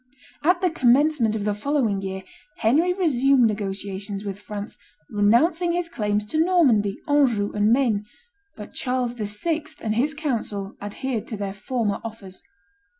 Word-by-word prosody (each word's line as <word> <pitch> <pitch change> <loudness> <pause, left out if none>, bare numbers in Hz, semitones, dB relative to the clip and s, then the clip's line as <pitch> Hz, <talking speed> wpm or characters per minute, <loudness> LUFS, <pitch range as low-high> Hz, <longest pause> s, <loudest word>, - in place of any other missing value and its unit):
At 355 +3 +3
the 365 -2 +2
commencement 260 -4 +3
of 210 -2 -3
the 210 - +1
following 220 -3 0
year, 190 0 -5 0.3
Henry 305 +11 +3
resumed 275 -8 +3
negotiations 200 -1 -3
with 200 0 -5
France, 205 0 -7 0.4
renouncing 315 - +3
his 350 -1 -1
claims 210 -7 -1
to 315 +1 +3
Normandy, 255 - +3
Anjou, 255 -9 +2
and 210 +1 +2
Maine; 230 -5 +2 0.5
but 210 -1 -10
Charles 250 -2 -1
VI. 245 +9 -2 0.2
and 215 - -1
his 280 +7 0
council 220 -9 -3
adhered 225 +3 -4
to 220 - -4
their 200 -1 -3
former 210 0 -2
offers. 210 -4 -8
225 Hz, 145 wpm, -24 LUFS, 205-290 Hz, 0.5 s, At